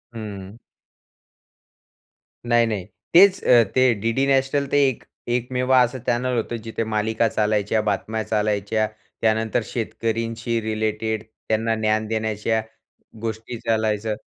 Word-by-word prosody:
हं. 100 -1 -7 1.9
नाही-नाही. 115 -5 +2 0.3
तेचं 190 +2 +6
अ, - - +4
ते 130 -1 +5
डी-डी 115 +4 +1
नॅशनल 135 +1 +2
ते - - +3
एक 130 - -3 0.3
एकमेव 125 +1 -1
असं 125 0 +4
चॅनेल 125 +1 +1
होतं, 115 +1 -2
जिथे 115 0 -3
मालिका 110 +1 0
चालायच्या, 105 0 +1
बातम्या 110 +1 -2
चालायच्या, 105 0 0 0.3
त्यानंतर 110 +1 +1
शेतकऱ्यांशी 115 0 -2
रिलेटेड 110 0 -2
त्यांना 110 0 -2
ज्ञान 110 0 0
देण्याच्या 110 0 -1 0.6
गोष्टी 115 +1 -4
चालायचं. 110 -2 0
110 Hz, 110 wpm, -23 LUFS, 110-120 Hz, 1.9 s, तेचं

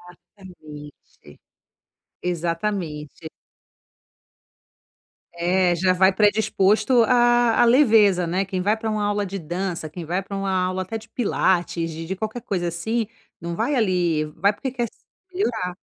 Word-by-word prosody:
Exatamente. 155 - -15 0.8
Exatamente. 170 -3 -3 2.0
É, 175 +1 +2
já 185 +2 +2
vai 190 +1 +4
predisposto 215 +3 +3
à 240 +1 +4 0.2
à - - +6
leveza, 220 -8 +4
né, 185 +4 0
quem 190 -1 -3
vai 210 +4 +1
para 220 0 -3
uma 210 -1 -1
aula 205 0 0
de 195 +1 -5
dança, 175 0 -4
quem 170 +2 -8
vai 180 +4 -2
para 200 +1 -7
uma 195 0 -2
aula 185 0 0
até 225 +4 -5
de 225 +1 -15
pilates, 180 -7 0
de 165 +1 -7
de 190 - -4
qualquer 220 +4 -4
coisa 175 -3 -2
assim, 220 +7 -2 0.3
não 170 0 -4
vai 245 +6 0
ali 180 -9 +1
Vai 200 +5 +3
porque 265 +5 -5
quer 245 -2 -2
s - - -5 0.4
melhorar. 220 - -2
190 Hz, 145 wpm, -23 LUFS, 175-215 Hz, 2.0 s, à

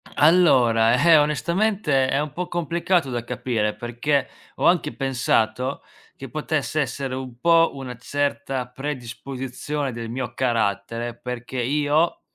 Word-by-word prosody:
Allora, 125 -9 +5
eh, 165 -2 +7
onestamente 155 -1 +1
è 135 +2 +1
un 150 -2 -4
po' 180 +3 -4
complicato 170 -2 0
da 120 -2 -3
capire, 120 -3 -2
perché 120 +5 -1 0.3
ho - - -2
anche 170 -4 +3
pensato 125 -1 0 0.3
che 135 -2 -9
potesse 155 +1 -2
essere 130 0 -3
un 130 -2 -7
po' 165 +1 +4
una 130 -3 -7
certa 140 -1 -2
predisposizione 135 +1 -5
del 115 -1 -6
mio 120 -1 -4
carattere, 115 -1 -1
perché 125 +1 -5
io, 150 +5 +1
135 Hz, 125 wpm, -23 LUFS, 120-150 Hz, 0.3 s, eh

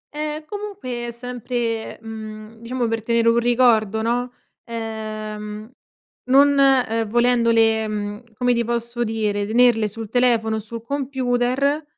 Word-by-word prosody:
Ehm, 305 0 -4
comunque 395 - -5
è - - -4
sempre, 240 -1 -3
mhmm, 220 0 -9
diciamo 240 +1 -2
per 225 0 -1
tenere 230 +1 +2
un 230 +1 +4
ricordo, 230 -3 +3
no, 245 +2 0 0.3
ehm, 215 -1 -6 0.5
non, 275 +3 +6
uhm, 255 -5 +3
volendole, 230 -2 +3
mhmm, 210 +1 -4
come 245 +2 +2
ti 235 0 +1
posso 235 +1 -2
dire, 210 -3 -1
tenerle 230 -1 +4
sul 220 +1 -7
telefono 230 -2 +2
o - - -2
sul 225 +2 -8
computer, 265 +2 0
235 Hz, 130 wpm, -22 LUFS, 220-250 Hz, 0.5 s, non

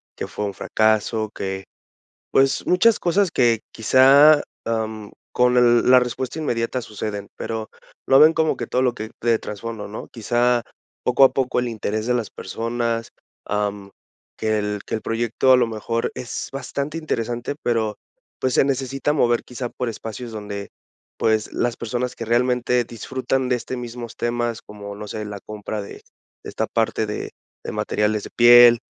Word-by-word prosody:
que - - -5
fue 105 - -4
un 100 - -3
fracaso 110 +2 +1
que, 95 0 -4 0.7
pues, 135 0 +2
muchas 210 +5 +4
cosas 180 +2 +2
que 120 -7 +3
quizá, 140 +6 +6 0.2
am, 110 -2 -3 0.2
con 125 0 +3
el 120 0 +5
la 130 0 +8
respuesta 125 +4 -3
inmediata 120 -4 -1
suceden, 105 -2 -5
pero 110 -1 -4 0.4
lo 135 - +6
ven 155 +1 +8
como 160 -1 +1
que - - -4
todo 125 - 0
lo 125 -2 +2
que 110 -1 -6
de 115 -1 +2
trasfondo, 105 0 -6
¿no?, 105 - -8
quizá 120 +1 +1 0.4
poco 125 +2 +5
a - - +5
poco 130 -2 0
el 125 - -2
interés 110 0 -3
de 125 - +2
las 115 -4 -2
personas, 115 -1 -3 0.3
am, 105 -1 -2 0.5
que 110 -1 0
el 105 0 -2
que - - -4
el 110 - -3
proyecto, 115 +4 0
a 130 - +8
lo 125 - +3
mejor, 115 +1 -2
es 125 -2 -5
bastante 140 +3 -4
interesante, 120 -4 -3
pero, 110 -3 0 0.4
pues, 130 -2 0
se - - +5
necesita 135 +1 -1
mover 120 -5 +2
quizá 125 0 -5
por 125 - -3
espacios 115 +1 -6
donde, 105 -2 -6 0.5
pues, 110 -1 +1
las 120 -1 -1
personas 120 +2 -3
que 115 - -5
realmente 125 +1 +2
disfrutan 130 +3 -2
de 125 - +2
este 130 +2 -5
mismos 120 -1 -7
temas, 120 -1 -2
como 100 -1 -9
no 105 0 -8
sé, 105 +1 -5
la 105 -1 -7
compra 105 +1 -6
de 100 - -10 0.4
de - - -6
esta 110 - -2
parte 110 -1 0
de 105 - -5 0.3
de - - -4
materiales 105 0 0
de - - -9
piel, 120 0 +8
120 Hz, 170 wpm, -22 LUFS, 110-125 Hz, 0.7 s, la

